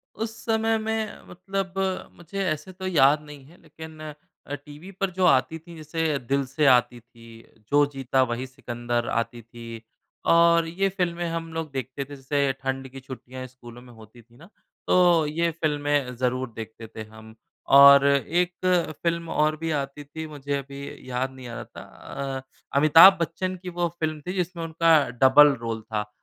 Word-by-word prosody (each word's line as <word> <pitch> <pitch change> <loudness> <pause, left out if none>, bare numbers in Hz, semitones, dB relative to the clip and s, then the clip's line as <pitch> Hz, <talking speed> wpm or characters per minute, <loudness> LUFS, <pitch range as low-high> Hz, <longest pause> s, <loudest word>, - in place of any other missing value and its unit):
उस 225 0 -4
समय 225 0 +1
में 220 0 -3
मतलब 190 +1 -4 0.4
मुझे 185 +4 -5
ऐसे 155 +5 -4
तो 185 0 -6
याद 150 -4 +4
नहीं 145 -2 -12
है, 165 +5 -19
लेकिन 160 -1 -12 0.5
अ, 145 - -2
टीवी 150 +6 -12
पर 195 0 -2
जो 185 +1 0
आती 150 0 +3
थी, 170 +1 -14
जैसे 155 -1 -2
दिल 135 +2 -1
से 140 +4 -1
आती 125 -2 +4
थी, 115 -1 -17 0.2
जो 145 0 +5
जीता 135 -1 0
वही 125 +2 -3
सिकंदर 120 -2 -4
आती 115 +1 -2
थी, 115 0 -10 0.4
और 170 0 +5
ये 195 +4 0
फ़िल्में 175 -2 -2
हम 165 0 -4
लोग 160 -2 -4
देखते 135 +1 -5
थे। 145 +1 -10
जैसे 140 +1 0
ठंड 135 0 -3
की 135 +1 -10
छुट्टियाँ 130 0 -9
स्कूलों 120 -1 -14
में 125 -1 -15
होती 110 +1 -16
थीं 120 +1 -24
ना, 165 +6 -16 0.4
तो 175 -3 +4
ये 170 +3 0
फ़िल्में 145 -4 -1
ज़रूर 125 +1 -1
देखते 110 0 -8
थे 110 0 -8
हम। 110 0 -13 0.4
और 140 0 +9
एक 170 +6 +1 0.5
फ़िल्म 170 -1 -1
और 155 0 +1
भी 165 +1 -3
आती 140 -1 -3
थी, 160 +2 -8
मुझे 145 -2 -4
अभी 140 -1 -9
याद 130 +1 -2
नहीं 130 -1 -11
आ 120 - -8
रहा - - -6
था। 110 - -12 0.6
अ, - - -11 0.4
अमिताभ 165 +6 +8
बच्चन 185 +3 -2
की 180 - -5
वो 175 0 -1
फ़िल्म 155 -1 -2
थी 180 - -2
जिसमें 180 -2 -3
उनका 165 0 +4 0.2
डबल 140 +2 +7
रोल 115 -1 -4
था। 105 -1 -4
145 Hz, 175 wpm, -25 LUFS, 130-170 Hz, 0.6 s, और